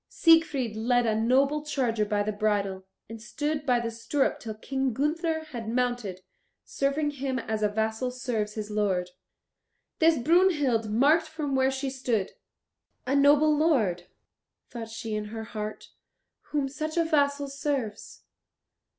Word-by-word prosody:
Siegfried 300 Hz, -9 st, +3 dB
led 240 Hz, +2 st, +2 dB
a 220 Hz, -, +2 dB
noble 270 Hz, +7 st, +2 dB
charger 240 Hz, -7 st, 0 dB
by 205 Hz, 0 st, 0 dB
the 215 Hz, -, -1 dB
bridle, 200 Hz, -3 st, -1 dB, 0.2 s
and 225 Hz, 0 st, -9 dB
stood 295 Hz, +4 st, -3 dB
by 245 Hz, -1 st, +4 dB
the 235 Hz, -1 st, -3 dB
stirrup 230 Hz, +5 st, -1 dB
till 220 Hz, -2 st, -6 dB
King 265 Hz, +3 st, -2 dB
Gunther 320 Hz, +5 st, 0 dB
had 230 Hz, -4 st, -5 dB
mounted, 245 Hz, -6 st, -1 dB, 0.4 s
serving 285 Hz, +2 st, -1 dB
him 270 Hz, -2 st, -3 dB
as 220 Hz, -3 st, -3 dB
a 210 Hz, -, +2 dB
vassal 220 Hz, +4 st, -1 dB
serves 240 Hz, -4 st, -3 dB
his 215 Hz, -1 st, -5 dB
lord. 190 Hz, -4 st, 0 dB, 0.9 s
This 325 Hz, -1 st, +5 dB
Brunhild 290 Hz, -, +2 dB
marked 295 Hz, +9 st, +3 dB
from 310 Hz, -3 st, -4 dB
where 265 Hz, 0 st, +3 dB
she 270 Hz, 0 st, -3 dB
stood. 240 Hz, -7 st, -1 dB, 0.7 s
"A 265 Hz, -, 0 dB
noble 290 Hz, +2 st, +5 dB
lord," 220 Hz, -, +1 dB, 0.6 s
thought 230 Hz, -2 st, -6 dB
she 225 Hz, 0 st, -5 dB
in 210 Hz, 0 st, -2 dB
her 220 Hz, +1 st, -6 dB
heart, 215 Hz, -1 st, -6 dB, 0.6 s
"whom 290 Hz, -2 st, -1 dB
such 310 Hz, +4 st, -5 dB
a 335 Hz, -, +3 dB
vassal 285 Hz, -2 st, +1 dB
serves." 275 Hz, -6 st, -4 dB
250 Hz, 145 wpm, -27 LUFS, 220-290 Hz, 0.9 s, This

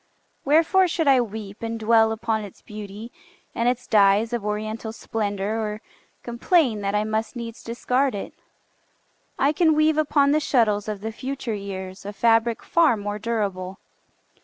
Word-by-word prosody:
Wherefore 330 Hz, +6 st, +4 dB
should 325 Hz, -2 st, -1 dB
I 265 Hz, -2 st, +6 dB
weep 215 Hz, -2 st, -7 dB
And 230 Hz, 0 st, -4 dB
dwell 225 Hz, 0 st, +4 dB
upon 220 Hz, 0 st, -1 dB
its 200 Hz, -, -12 dB
beauty, 210 Hz, +2 st, -9 dB, 0.4 s
and 235 Hz, +1 st, +1 dB
its 250 Hz, 0 st, -2 dB
dyes 210 Hz, +2 st, +3 dB
Of 235 Hz, -3 st, -2 dB
oriental 215 Hz, +1 st, -3 dB
splendor, 215 Hz, -1 st, -3 dB
or 210 Hz, -1 st, -3 dB, 0.4 s
complain 240 Hz, -, +1 dB
That 200 Hz, +1 st, -1 dB
I 210 Hz, -, +2 dB
must 220 Hz, +2 st, -2 dB
needs 230 Hz, -1 st, -7 dB
discard 250 Hz, +2 st, 0 dB
it? 200 Hz, -, -6 dB, 1.0 s
I 275 Hz, +2 st, +3 dB
can 315 Hz, -1 st, +3 dB
weave 310 Hz, 0 st, +3 dB
Upon 285 Hz, -2 st, +3 dB
the 305 Hz, -, +3 dB
shuttles 220 Hz, -8 st, +1 dB
of 210 Hz, -2 st, -4 dB
the 220 Hz, +1 st, -4 dB
future 255 Hz, 0 st, -4 dB
years 190 Hz, -2 st, -6 dB
A 205 Hz, +1 st, -6 dB
fabric 225 Hz, +2 st, +2 dB
far 325 Hz, -9 st, +3 dB
more 205 Hz, 0 st, -4 dB
durable. 195 Hz, -4 st, -3 dB
225 Hz, 160 wpm, -24 LUFS, 210-250 Hz, 1.0 s, I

